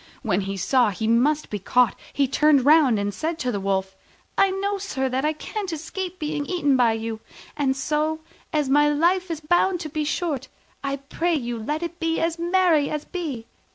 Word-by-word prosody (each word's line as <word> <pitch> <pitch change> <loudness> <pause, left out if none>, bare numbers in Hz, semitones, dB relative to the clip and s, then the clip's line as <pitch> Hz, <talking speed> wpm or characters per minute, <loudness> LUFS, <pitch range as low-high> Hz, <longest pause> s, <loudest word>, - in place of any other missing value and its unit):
When 205 -5 +1
he 195 0 -4
saw 240 +5 +3
he 205 +3 -4
must 280 +7 +2
be 210 - -2
caught 245 +3 +3 0.2
he 280 -1 +1
turned 285 0 +3
round 290 -6 +6
and 200 0 -2
said 320 +6 -3
to 250 -5 -1
the 205 - -2
Wolf, 190 0 -1 0.4
"I 390 - +4
know, 395 +1 -2
sir, 275 -9 -2
that 260 +1 -1
I 305 +1 +1
can't 390 +5 -5
escape 355 +3 -5
being 300 -2 -3
eaten 290 -7 +2
by 240 -3 +4
you: 225 0 -4 0.4
and 270 -2 0
so, 305 +3 -1 0.3
as 300 -3 +1
my 295 +2 +4
life 350 +5 +2
is 320 -2 -4
bound 350 +3 +2
to 310 - -5
be 305 0 -2
short, 295 -3 -2 0.4
I 275 0 -1
pray 325 +5 -1
you 240 -4 -2
let 300 +9 -3
it 340 0 -5
be 330 -1 0
as 330 0 -1
merry 345 -4 +3
as 300 -1 -3
may 365 - -2
be. 270 -10 -4
295 Hz, 205 wpm, -24 LUFS, 250-330 Hz, 0.4 s, round